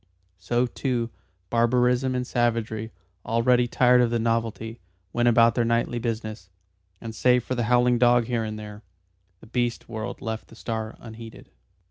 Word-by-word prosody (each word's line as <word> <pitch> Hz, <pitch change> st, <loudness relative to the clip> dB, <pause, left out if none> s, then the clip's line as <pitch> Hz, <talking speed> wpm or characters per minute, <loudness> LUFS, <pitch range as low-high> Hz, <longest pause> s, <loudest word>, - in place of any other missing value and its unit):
So, 120 Hz, +7 st, +1 dB
too, 120 Hz, -2 st, -2 dB, 0.4 s
barbarism 125 Hz, +2 st, +2 dB
and 125 Hz, 0 st, -1 dB
savagery, 115 Hz, -3 st, -1 dB, 0.3 s
already 120 Hz, +2 st, +2 dB
tired 125 Hz, +1 st, +4 dB
of 120 Hz, -, +3 dB
the 120 Hz, -, 0 dB
novelty, 115 Hz, 0 st, -2 dB, 0.3 s
went 120 Hz, 0 st, +2 dB
about 115 Hz, 0 st, +5 dB
their 120 Hz, -, +1 dB
nightly 115 Hz, +1 st, 0 dB
business, 110 Hz, -4 st, -4 dB, 0.5 s
and 115 Hz, -1 st, -7 dB
save 125 Hz, +2 st, +3 dB
for 130 Hz, -, -3 dB
a 120 Hz, -, -1 dB
howling 120 Hz, +1 st, +3 dB
dog 120 Hz, -1 st, +4 dB
here 115 Hz, -1 st, -1 dB
and 110 Hz, -1 st, -4 dB
there, 105 Hz, 0 st, -9 dB, 0.6 s
the -, -, -13 dB
beast 120 Hz, +1 st, -2 dB
world 110 Hz, 0 st, -5 dB
left 110 Hz, -1 st, -5 dB
the -, -, -15 dB
star 110 Hz, -1 st, -4 dB
unheeded. 115 Hz, 0 st, -11 dB
115 Hz, 155 wpm, -25 LUFS, 110-120 Hz, 0.6 s, about